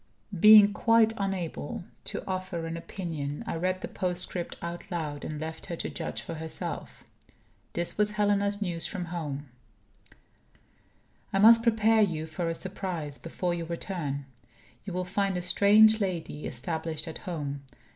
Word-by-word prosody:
Being 210 +1 +9
quite 230 0 +4
unable 185 -6 -3 0.2
to - - -4
offer 185 -3 -3
an 165 0 -4
opinion, 160 -5 -5
I - - -3
read 185 +2 -1
the - - -4
postscript 180 -1 -2
out 170 +3 -6
loud, 155 -5 -3
and 155 -1 -4
left 160 +1 -6
her 175 - -3
to - - -4
judge - - -4
for - - -6
herself. 160 0 -5 0.7
This 175 +4 -2
was 210 0 +3
Helena's 205 0 +1
news 170 -3 -2
from 185 -4 -4
home: 145 -4 -4 1.8
"I - - +1
must 230 +3 +8
prepare 225 -1 +4
you 165 -6 +1
for 165 +2 -3
a 165 - -2
surprise, 175 -6 -5
before 175 +1 -2
your 170 -1 -4
return. 165 -5 -3 0.6
You 195 - -5
will 180 0 -1
find 195 +1 0
a 180 - -3
strange 215 +4 +6
lady 170 -6 -3
established 160 +4 -3
at 160 - -6
home. 145 -4 -3
175 Hz, 150 wpm, -28 LUFS, 160-200 Hz, 1.8 s, Being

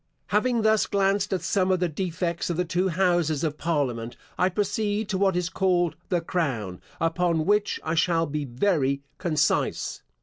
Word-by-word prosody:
Having 230 +2 +2
thus 220 -1 +3
glanced 200 +1 +1
at 185 -4 -1
some 190 -2 +1
of 185 -1 +2
the 180 - +1
defects 170 +1 -2
of 170 - -1
the 180 - +1
two 180 +2 0
houses 175 -4 +1
of 150 -2 -2
parliament, 125 -8 -1 0.2
I 185 - +2
proceed 205 +2 -1
to 190 - 0
what 195 -2 +3
is 180 -1 0
called 175 -1 +1
the 175 -2 +1
crown, 130 - -2 0.2
upon 165 -1 +1
which 205 +1 +1
I 160 - -1
shall 165 0 +2
be 150 -1 -3
very 140 0 0 0.2
concise. 155 -5 0
175 Hz, 170 wpm, -26 LUFS, 155-195 Hz, 0.2 s, thus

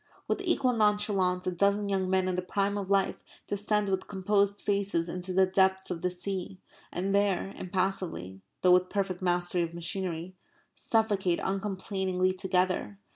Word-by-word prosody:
With - - 0
equal 275 -8 +2
nonchalance 205 -4 +2
a 185 - 0
dozen 200 +3 +1
young 190 -2 0
men 190 0 +2
in 185 - 0
the 180 - -1
prime 200 +2 -1
of 200 -2 -4
life 195 -1 +1 0.2
descend 210 0 0
with 190 -1 -1
composed 200 +1 +1
faces 200 -4 0
into 180 +2 -5
the 190 +1 +4
depths 190 0 +2
of 170 -2 -3
the 180 - +1
sea; 185 +1 -4 0.3
and 195 +2 -2
there 200 -1 +1
impassively 180 - -3 0.2
(though 180 - +6
with 180 0 +4
perfect 195 -3 -2
mastery 175 0 +1
of 170 0 -3
machinery) 170 0 -3 0.4
suffocate 205 -6 +1
uncomplainingly 190 -1 -1
together. 185 - 0
190 Hz, 155 wpm, -29 LUFS, 180-200 Hz, 0.4 s, though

